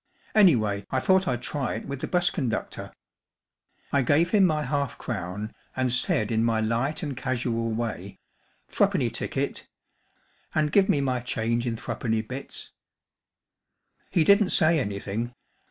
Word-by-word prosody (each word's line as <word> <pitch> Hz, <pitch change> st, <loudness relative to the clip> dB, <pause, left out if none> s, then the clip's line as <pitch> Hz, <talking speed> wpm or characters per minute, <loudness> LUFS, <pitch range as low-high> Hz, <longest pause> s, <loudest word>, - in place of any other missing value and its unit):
Anyway, 110 Hz, -, +4 dB
I 130 Hz, -, +1 dB
thought 190 Hz, +6 st, +3 dB
I'd 125 Hz, -5 st, -1 dB
try 140 Hz, -2 st, -2 dB
it 110 Hz, -, -6 dB
with 140 Hz, -1 st, -5 dB
the -, -, -2 dB
bus 180 Hz, -1 st, +2 dB
conduct 125 Hz, -9 st, -2 dB
or. -, -, -7 dB, 1.0 s
I 140 Hz, -, +4 dB
gave 155 Hz, +7 st, +3 dB
him 200 Hz, -3 st, +5 dB
my 155 Hz, -2 st, 0 dB
half 140 Hz, 0 st, -2 dB
crown, 105 Hz, -1 st, -4 dB, 0.2 s
and 130 Hz, -1 st, +1 dB
said 110 Hz, -3 st, +1 dB
in 110 Hz, 0 st, +2 dB
my 115 Hz, -1 st, +2 dB
light 115 Hz, +7 st, -1 dB
and 145 Hz, -3 st, -3 dB
casual 120 Hz, -2 st, -1 dB
way, 110 Hz, -4 st, -4 dB, 0.3 s
* -, -, -37 dB
Three¬ -, -, +3 dB
penny -, -, +1 dB
ticket -, -, -3 dB, 0.9 s
And 150 Hz, -1 st, +2 dB
give 195 Hz, +1 st, +4 dB
me 140 Hz, -, +3 dB
my 130 Hz, -2 st, 0 dB
change 120 Hz, 0 st, -1 dB
id 115 Hz, -1 st, -2 dB
three¬ -, -, -5 dB
penny 110 Hz, -2 st, 0 dB
bits/ 130 Hz, +5 st, -7 dB, 1.3 s
i -, -, -38 dB
He 170 Hz, -, +3 dB
didn't 200 Hz, +3 st, +5 dB
say 160 Hz, 0 st, +4 dB
anything. 105 Hz, +2 st, -3 dB
125 Hz, 165 wpm, -26 LUFS, 115-150 Hz, 1.3 s, him